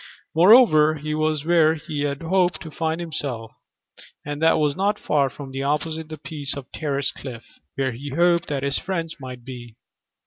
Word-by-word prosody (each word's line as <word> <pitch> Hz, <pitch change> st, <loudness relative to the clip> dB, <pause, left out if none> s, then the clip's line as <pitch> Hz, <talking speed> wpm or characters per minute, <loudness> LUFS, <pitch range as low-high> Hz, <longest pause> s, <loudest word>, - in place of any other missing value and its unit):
Moreover, 165 Hz, -4 st, +6 dB
he 150 Hz, 0 st, -4 dB
was 155 Hz, -1 st, 0 dB
where 160 Hz, -2 st, +4 dB
he 155 Hz, -2 st, -5 dB
had 145 Hz, +2 st, -2 dB
hoped 180 Hz, +1 st, +1 dB
he 160 Hz, -, -8 dB
might -, -, -16 dB
find 160 Hz, 0 st, -1 dB
himself, 140 Hz, -9 st, -4 dB, 0.7 s
and 145 Hz, +1 st, -5 dB
that 160 Hz, -, +5 dB
was 150 Hz, -2 st, +1 dB
not 200 Hz, +3 st, +1 dB
far 140 Hz, -7 st, +1 dB
from 135 Hz, 0 st, -9 dB
opposite 155 Hz, +2 st, -2 dB
the 155 Hz, -, -7 dB
piece 145 Hz, -2 st, -5 dB
of 140 Hz, -, -7 dB
terraced 140 Hz, -3 st, -1 dB
cliff 120 Hz, -4 st, -8 dB, 0.3 s
where 135 Hz, -1 st, 0 dB
he 135 Hz, +5 st, -7 dB
hoped 170 Hz, +4 st, +2 dB
that 140 Hz, -2 st, -2 dB
his 140 Hz, 0 st, 0 dB
friends 170 Hz, -4 st, -4 dB
might 125 Hz, -2 st, -9 dB
be. 120 Hz, -3 st, -9 dB
150 Hz, 180 wpm, -23 LUFS, 140-165 Hz, 0.7 s, Moreover